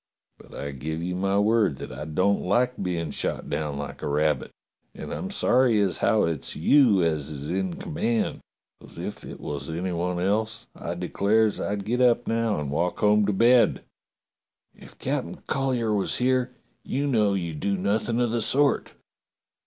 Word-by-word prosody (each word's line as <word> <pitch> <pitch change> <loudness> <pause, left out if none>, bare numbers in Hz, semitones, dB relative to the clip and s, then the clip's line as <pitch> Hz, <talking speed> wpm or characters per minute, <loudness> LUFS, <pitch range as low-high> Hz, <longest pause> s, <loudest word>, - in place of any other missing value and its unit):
But - - -14
I 70 - -5
give 80 +5 -4
you 90 +1 -2
my 95 +2 0
word 105 -5 +3
that - - -8
I 75 - -6
don't 95 +6 +1
like 125 -1 +1
being 85 -4 -2
shot - - -3
down 75 -1 -2
like 70 0 -6
a - - -3
rabbit, 75 +1 +1 0.5
and - - -6
I'm 190 - -4
sorry 125 - +3
as 100 -3 +1
how 110 -2 +3
it's 80 -4 -2
you 105 - +4
as 80 -3 0
is 75 +1 -5
in 95 -1 -1
command, 115 +8 -1 0.4
'cos - - -14
if - - -6
it - - -9
was 70 +1 -5
any 90 +3 -3
one 90 +1 -1
else 110 +5 -1
I 85 - -5
declares 100 +5 +1
I'd 100 -1 -2
get 125 +3 0
up 120 -1 +3
now 115 -5 0
and 70 -2 -4
walk 85 +4 0
home 105 -1 +3
to - - +2
bed." 120 +4 +4 0.9
"If - - -15
Captain - - -3
Collyer 125 -5 0
was 100 -2 0
here, 125 0 +1 0.3
you 140 +2 -2
know 105 -7 +2
you'd 85 -5 -3
do 100 +3 0
nothing 110 +5 0
of 120 -2 +1
the 120 0 0
sort." 140 +5 +1
100 Hz, 175 wpm, -25 LUFS, 85-115 Hz, 0.9 s, you